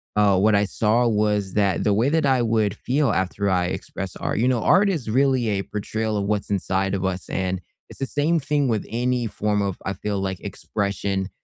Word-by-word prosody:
uh, 100 -2 +4
what 105 +2 +4
I 100 - +3
saw 115 +4 +2
was 105 -3 +1
that 100 -3 +2
the 105 - +2
way 115 +6 +2
that 160 0 +2
I 130 -2 +3
would 110 -4 +1
feel 135 0 0
after 95 +1 -1
I 90 -1 +2
express 95 +1 -5
art - - -3
you 120 - +2
know, 125 -3 +1
art 195 - +4
is 150 - -2
really 130 -1 +2
a 100 -1 0
portrayal 110 +2 -3
of 100 - -1
what's 105 0 -1
inside 95 0 0
of 95 -1 -1
us, 95 -1 -2
and 95 -1 -1 0.3
it's - - -10
the 135 - -1
same 150 +5 +1
thing 145 -1 0
with 110 -4 -1
any 125 +1 0
form 105 0 -1
of, 95 -2 -2
I 95 - -1
feel 100 +1 -3
like, 95 -1 -3
expression. 100 -1 -3
105 Hz, 215 wpm, -23 LUFS, 95-125 Hz, 0.3 s, uh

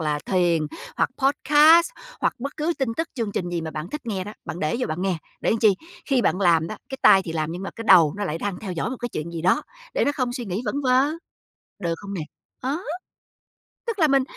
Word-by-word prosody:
là 150 -2 0
thiền, 175 -4 +2 0.3
hoặc - - +2
podcast, 300 - +6 0.3
hoặc - - +1
bất 275 +3 -5
cứ 315 +2 0
tin 265 - 0
tức, 325 +1 -1
chương 225 -5 -2
trình 175 - -2
gì 175 -1 -2
mà 160 -1 -4
bạn 155 +4 -6
thích 300 - -4
nghe 195 -5 -2
đó, 210 - -7
bạn 170 - -5
để 155 +5 0
vô 250 - 0
bạn 160 +4 -3
nghe. 190 -2 +1 0.2
Để - - +1
làm 225 - +2
chi? 215 -3 +5 0.3
Khi 265 -4 +2
bạn 190 -1 +1
làm 165 -4 +4
đó, - - -5
cái 265 - -6
tay 190 - +7
thì 165 - -4
làm, 155 0 -2
nhưng 180 +2 -6
mà 195 - -4
cái 230 - -6
đầu 170 -5 +7
nó 205 - -2
lại 165 -4 -2
đang 195 -1 -3
theo 195 -4 -4
dõi 170 +6 -2
một 260 - -4
cái 240 - -2
chuyện 170 -6 -5
gì 165 -1 -5
đó, 180 +2 +3 0.3
để - - +2
nó 285 - +2
không 255 -4 -1
suy 245 -1 -4
nghĩ 195 +2 -3
vẩn 210 - -2
vơ, 255 0 +4 0.7
được 170 -4 -1
không 200 -1 -7
nè? 185 - -3 0.4
Ờ. 270 +5 -1 1.1
Tức 450 -3 -2
là 315 - +5
mình 275 -1 +4
200 Hz, 255 wpm, -24 LUFS, 170-265 Hz, 1.1 s, tay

